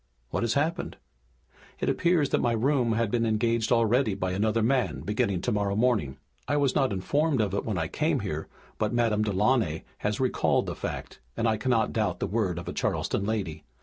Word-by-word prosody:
"What - - -1
has 115 -1 0
happened?" 155 +4 -1 0.8
"It - - -2
appears 170 -5 +2
that - - +1
my 120 - +2
room 120 0 +2
had 115 -2 0
been 120 -1 +1
engaged 115 +1 +1
already 115 -1 +3
by 95 -1 -2
another 110 +4 +1
man, 125 +1 +1
beginning 100 -3 0
tomorrow 100 -2 0
morning. 110 - +1 0.3
I - - +1
was 140 -3 +2
not 135 -2 +2
informed 140 +9 +1
of 105 -3 0
it 100 - -1
when 105 -5 -2
I 80 -1 -1
came - - 0
here, - - -4 0.3
but 105 -1 0
Madame 115 -3 +2
Delaunay 105 -4 +1 0.2
has 105 0 -1
recalled 130 -1 +1
the - - -3
fact - - -6 0.2
and 115 - +1
I 110 -1 +2
cannot 115 0 +1
doubt 105 -6 0
the - - 0
word 100 -3 -1
of 85 - -6
a - - -3
Charleston 100 - -1
lady. 95 -9 -3
110 Hz, 195 wpm, -27 LUFS, 100-125 Hz, 0.8 s, already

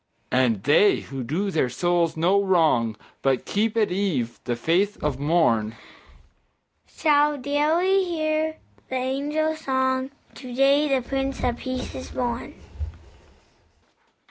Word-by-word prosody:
And 120 -6 +2
they 155 +9 +4
who 135 -1 -7
do 180 - -2
their 155 -7 +1
souls 170 +4 0
no 185 +5 +3
wrong, 155 - +2 0.2
But 135 -2 +1
keep 220 +2 0
at 215 -4 +2
eve 175 - -1
the 120 -1 -1
faith 180 - +1
of 145 -3 -1
morn, 140 -8 +1 1.1
Shall 295 -1 +2
daily 315 +8 +2
hear 315 -2 -1 0.3
the 260 - -3
angel 290 +5 -1
song, 260 -3 -1 0.2
"To 255 -2 -10
day 275 +3 +4
the 265 -3 0
Prince 270 0 -2
of 240 -1 0
Peace 255 -1 -5
is 260 - -7
born!" 245 -2 -4
230 Hz, 125 wpm, -24 LUFS, -, 1.1 s, they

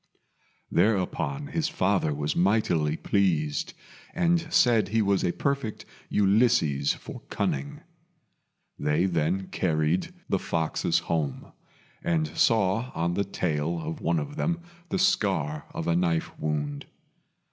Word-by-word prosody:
Thereupon 110 +7 +1
his 160 -1 -1
father 95 -4 +1
was 75 +1 -2
mightily 85 -6 +2
pleased, 80 -7 0 0.4
and 170 -1 +1
said 120 -7 +4
he 110 +2 +1
was 100 -1 +2
a 90 - +2
perfect 140 -1 -2 0.2
Ulysses 100 - +3
for - - -9
cunning. 70 +1 -2 1.0
They 75 +5 +2
then 90 +2 0
carried 80 - 0 0.2
the 95 - +1
foxes 80 -3 0
home, 75 -5 -2 0.5
and 165 -2 +1
saw 115 +3 +2
on 85 +1 0
the 100 - +1
tail 85 -3 -1
of 80 0 -5
one 85 0 +1
of 80 - -4
them 170 +1 0 0.3
the 190 - 0
scar 95 - +1
of - - -4
a 85 - +2
knife 85 -2 +1
wound. 75 -2 -2
90 Hz, 125 wpm, -27 LUFS, 75-115 Hz, 1.0 s, said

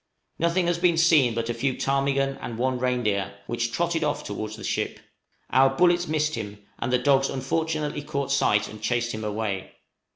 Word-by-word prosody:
Nothing 170 +2 +2
has 170 0 0
been 175 -2 +3
seen 155 -8 +4
but 115 0 -2
a 120 - -1
few 130 +2 -1
ptarmigan 135 0 +1
and 115 - -5
one 130 +1 0
reindeer, 105 -6 0
which 115 +1 -2
trotted 165 +4 0
off 145 -1 -1
towards 110 +1 -5
the 110 - -10
ship. - - -2 0.5
Our 135 +1 +5
bullets 175 +2 +3
missed 155 0 0
him, 105 -5 -5 0.2
and 120 - -2
the 125 - +4
dogs 135 +1 +3
unfortunately 150 +2 -2
caught 140 -2 -3
sight 105 -6 +2
and 110 -1 -10
chased 120 +1 0
him 110 -1 -5
away. 105 -2 -3
135 Hz, 185 wpm, -25 LUFS, 115-155 Hz, 0.5 s, Our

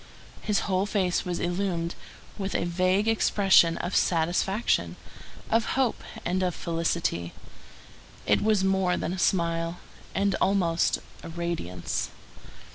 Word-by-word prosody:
His 210 -2 +1
whole 190 0 0
face 190 -4 0
was 175 -1 -2
illumined 175 -1 -1 0.4
with 195 -1 -4
a - - +1
vague 185 +4 +1
expression 195 -6 +4
of 180 - -3
satisfaction, 180 +6 +1 0.6
of 225 0 +3
hope, 260 -4 +1 0.2
and 185 +2 0
of 180 -2 0
felicity. 165 - -1 0.9
It - - +3
was 215 -3 +2
more 190 -2 +2
than 175 - -2
a 190 - -4
smile, 170 -1 +1 0.4
and 200 0 +2
almost 175 -4 +2 0.2
a - - -8
radiance. 165 - -3
180 Hz, 120 wpm, -27 LUFS, 170-195 Hz, 0.9 s, expression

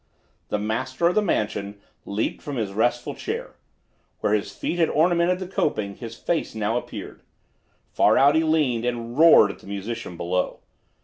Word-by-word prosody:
The - - 0
master 130 +9 0
of - - -1
the 215 - +3
mansion 105 - -2 0.3
leaped 100 +2 -2
from 145 - -5
his 110 -5 -2
restful 120 +3 0
chair. - - -5 0.6
Where 105 - +1
his 100 -1 0
feet 175 +11 -3
had 165 - +3
ornamented 175 +2 +2
the 185 - -5
coping 105 - -1
his 115 -1 -8
face 170 -8 -2
now 110 +1 -1
appeared. 120 - -6 0.7
Far - - +4
out 140 +2 +6
he 160 +1 +3
leaned, 150 -8 +1
and 120 -1 -3
roared 155 -9 +7
at - - -13
the - - -16
musician 100 -1 -5
below. 90 +1 -2
120 Hz, 170 wpm, -24 LUFS, 105-155 Hz, 0.7 s, roared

